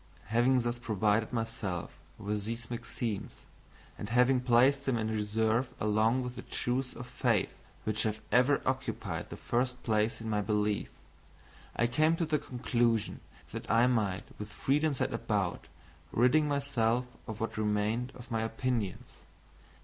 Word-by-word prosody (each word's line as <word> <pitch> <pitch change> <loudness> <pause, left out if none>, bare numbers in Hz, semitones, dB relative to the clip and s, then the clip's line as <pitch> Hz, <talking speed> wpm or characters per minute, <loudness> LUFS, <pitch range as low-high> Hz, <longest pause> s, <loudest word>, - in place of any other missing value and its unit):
Having 120 +3 +4
thus 120 0 -2
provided 110 -1 +1
myself 115 -7 -3 0.3
with 105 -1 -3
these 115 +2 -5
maxims, 115 -3 -4 0.6
and 105 - -5
having 125 +2 +4
placed 130 +3 +4
them 130 -3 +2
in 110 0 -1
reserve 110 +3 +1
along 110 +4 +2
with 125 0 -5
the - - -6
truths 125 +1 -2
of 125 - -7
faith, 120 -4 +1 0.3
which 110 0 -1
have 110 -1 -1
ever 130 +3 +4
occupied 130 0 -2
the - - -7
first 125 +1 -1
place 110 0 +1
in 115 - -6
my 105 -1 +1
belief, 105 0 0 0.9
I 120 - +2
came 155 +7 +3
to 165 - 0
the 155 -1 +1
conclusion 120 -4 0 0.3
that - - -6
I 115 +2 +5
might 105 -6 +1 0.2
with 105 0 -6
freedom 145 +2 +1
set - - -1
about - - -1 0.4
ridding 140 +6 +4
myself 130 -4 +1 0.2
of 110 -2 -6
what 115 - -2
remained 110 +4 0
of 120 0 -12
my 115 -1 +1
opinions. 110 -3 -2
115 Hz, 150 wpm, -31 LUFS, 110-125 Hz, 0.9 s, I